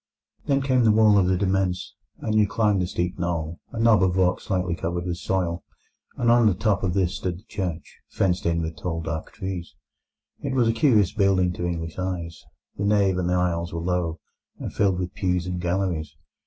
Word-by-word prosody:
Then 140 -1 +2
came 130 -2 +3
the 110 - +5
wall 105 -1 +5
of 90 - +2
the 95 0 +2
demesne, 95 -1 +1 0.4
and 110 - -1
you 105 -1 +4
climbed 105 -2 +1
a 90 - 0
steep 90 0 -3
knoll—a 85 +4 -4
knob 115 -2 +5
of 95 -1 +2
rock 90 -1 +1
lightly 90 -3 0
covered 85 +1 -3
with 85 -1 -2
soil—and 95 +6 -3
on 120 -1 +5
the 100 - +3
top 100 0 +1
of 95 -1 -1
this 90 -2 +1
stood 90 -2 -3
the 95 - -16
church, 90 -7 -5
fenced 90 -3 0
in 85 0 +1
with 80 -1 -5
tall 80 +1 -3
dark 80 -1 -4
trees. 95 -3 -6 0.7
It 135 - -2
was 120 -3 +3
a 115 - +3
curious 115 - +3
building 95 -3 +2
to 90 0 -3
English 80 0 -4
eyes. 90 -3 -4 0.3
The 100 - -1
nave 100 -3 +3
and 90 0 0
aisles 85 -2 0
were - - -2
low, 85 -1 -1 0.4
and - - -6
filled 95 -3 +2
with 90 -1 -3
pews 90 -2 0
and 90 -1 -3
galleries. 85 -4 -1
90 Hz, 195 wpm, -24 LUFS, 85-100 Hz, 0.7 s, the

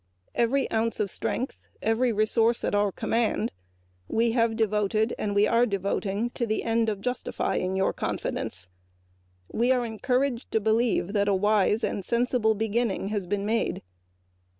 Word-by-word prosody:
Every 250 +4 +1
ounce 225 0 0
of 200 -3 0
strength 255 - -3 0.2
and 220 - 0
every 240 +2 +2
resource 225 +2 +2
at - - -1
our 205 -1 +2
command 230 +4 0 0.6
we 230 - +1
have 230 -1 +2
devoted 215 0 +1
to 205 +1 +1
the 215 - -1
end 230 -1 +1
of 205 -2 -3
justifying 200 -5 -2
your 190 0 +1
confidence. 90 0 -4 0.8
We 240 +3 +2
are 250 -2 +2
encouraged 250 +3 -1
to 220 - +3
believe 220 -2 +1
that 200 -1 +2
a 200 - +3
wise 210 +2 +2
and 200 - -1
sensible 235 0 +1
beginning 220 -1 -1
has 205 -4 -2
been 200 +1 -1
made. 225 +2 -1
220 Hz, 140 wpm, -27 LUFS, 205-235 Hz, 0.8 s, to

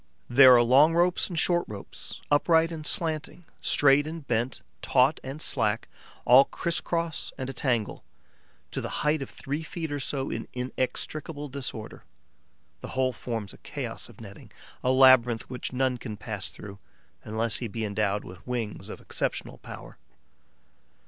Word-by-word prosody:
There 130 0 +8
are 120 - +5
long 140 +7 +5
ropes 175 +3 +2
and 175 - -5
short 175 +2 +3
ropes, 105 -2 -8
upright 160 +3 +4
and 155 -2 -6
slanting, 165 0 -2 0.2
straight 145 +1 +4
and 160 -2 -7
bent, 120 +2 -1 0.2
taut 130 +3 +3
and 135 +3 -6
slack, 110 -7 0 0.4
all 130 +3 +8
criss 170 -2 -1
cross 165 -2 -2
and 130 0 -4
a - - -11
tangle, 120 -4 -1 0.7
to - - -3
the - - -4 0.2
height 150 0 +2
of 135 - -5
three 145 +3 -4
feet 160 0 -5
or 145 - -2
so 135 0 -2
in - - -4
inextricable 145 +4 -3
disorder. 125 -5 -6 0.8
The - - -8
whole 130 -1 +2
forms 115 -4 -5
a - - -15
chaos - - -6
of - - -16
netting, - - -12 0.3
a 125 - +2
labyrinth 130 -3 +5
which 125 - -4
none 130 -1 0
can 110 -4 -6
pass 100 -3 -4
through, 100 -1 -11 0.4
unless 110 +1 0
he 120 - -3
be 110 +1 -4
endowed 105 0 -1
with 90 +4 -12
wings 120 -4 -4
of - - -8
exceptional - - -3
power. - - -11
130 Hz, 160 wpm, -27 LUFS, 115-150 Hz, 0.8 s, There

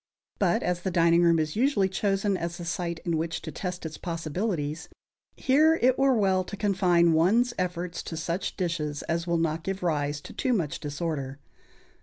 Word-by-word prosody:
But 185 -4 +2
as 175 0 -1
the 190 - -1
dining 170 -1 +4
room 170 -1 +4
is 155 -1 -1
usually 230 -5 +2
chosen 195 +1 0
as 170 -1 -4
the 175 - -7
site 170 -1 -2
in 170 -2 0
which 165 +1 -2
to 160 - -5
test 180 -1 -5
its 160 -1 -6
possibilities, 165 -2 -3 0.5
here 305 +5 +4
it 255 +1 +3
were 270 -1 +4
well 190 -4 +2
to 200 +2 -8
confine 180 -4 +3
one's 220 +10 +3
efforts 180 -1 -2
to 165 - -5
such 170 +3 -3
dishes 155 -5 -2
as 170 +1 -2
will 170 0 +1
not 165 0 -1
give 195 0 -4
rise 145 -3 0
to - - -11
too 260 -3 0
much 170 -10 -1
disorder. 145 -2 -4
175 Hz, 185 wpm, -27 LUFS, 165-195 Hz, 0.5 s, dining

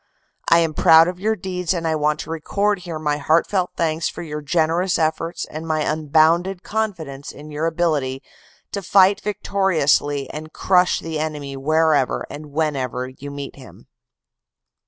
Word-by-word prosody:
"I 170 - +7
am 165 -2 0
proud 160 +2 +6
of 180 0 -4
your 220 +3 +1
deeds 180 -2 -2
and 165 -1 -2
I 160 - +1
want 150 0 0
to 160 - -7
record 200 +5 0
here 175 -3 -6
my 150 -1 -1
heart 160 +3 +2
felt 185 -3 0
thanks 160 0 0
for - - -7
your 150 -2 -5
generous 165 +4 +1
efforts 165 +1 -1
and 160 +1 -8
my 155 -1 0
unbounded 160 +5 +2
confidence 170 -11 -4
in 150 +1 -11
your 150 +2 -1
ability 150 -6 -1 0.5
to 200 - -3
fight 195 +1 +4
victoriously 175 -9 +1
and 155 +1 -8
crush 180 -1 +2
the 160 -1 -4
enemy 150 -3 -4
wherever 155 0 +1
and 150 +1 -8
whenever 135 -4 -2
you 135 +2 -10
meet 140 0 -7
him." 130 -3 -14
160 Hz, 160 wpm, -21 LUFS, 150-180 Hz, 0.5 s, I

